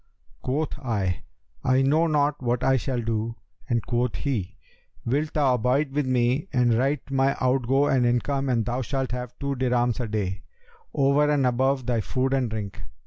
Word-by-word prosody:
Quoth 150 +4 -2
I, 100 -8 -1 0.4
'I 130 +1 +3
know 155 +5 +3
not 145 -2 +1
what 120 -1 0
I 135 0 +4
shall 130 0 -1
do,' 115 0 -2 0.3
and 120 -3 0
quoth 120 -4 0
he, 100 -2 -3 0.5
'Wilt 145 +5 0
thou 140 -4 +3
abide 125 +4 +1
with 145 -1 -1
me 130 +6 +1
and 125 -3 +3
write 135 +4 0
my 135 0 +2
outgo 130 +2 +2
and 135 -3 +2
income 135 +3 0
and 115 -3 +1
thou 125 +2 -1
shalt 135 +1 -2
have 125 -1 -5
two 140 0 -2
dirhams 125 -2 +1
a 120 - -2
day, 100 -3 -2 0.5
over 140 +2 +3
and 145 -3 +2
above 130 +1 +1
thy 120 -2 +1
food 130 +7 -1
and 130 -3 +1
drink?' 105 -2 -5
130 Hz, 175 wpm, -25 LUFS, 120-135 Hz, 0.5 s, I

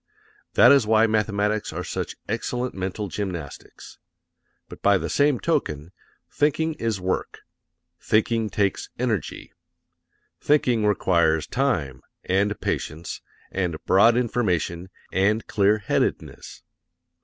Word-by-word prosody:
That - - +7
is 135 -6 +4
why 110 0 +5
mathematics 105 -1 0
are - - -5
such - - -4
excellent 125 0 -3
mental 95 +2 -4
gymnastics. 90 -7 -7 0.7
But - - -12
by 100 -1 +4
the - - -4
same 145 -2 +2
token, 85 - -2 0.4
thinking 160 +2 0
is 115 -4 -1
work. 95 0 -3 0.6
Thinking 110 0 +1
takes 100 -3 -1
energy. 115 -4 -3 0.9
Thinking 125 -7 +2
requires 85 -6 +2
time, 85 - -1 0.2
and 100 +2 0
patience, 80 +3 -4 0.3
and 90 -4 -1
broad 115 +5 +5
information, 95 -7 -1 0.2
and 105 +4 +1
clearheadedness. 105 +1 -1
105 Hz, 105 wpm, -24 LUFS, 95-115 Hz, 0.9 s, That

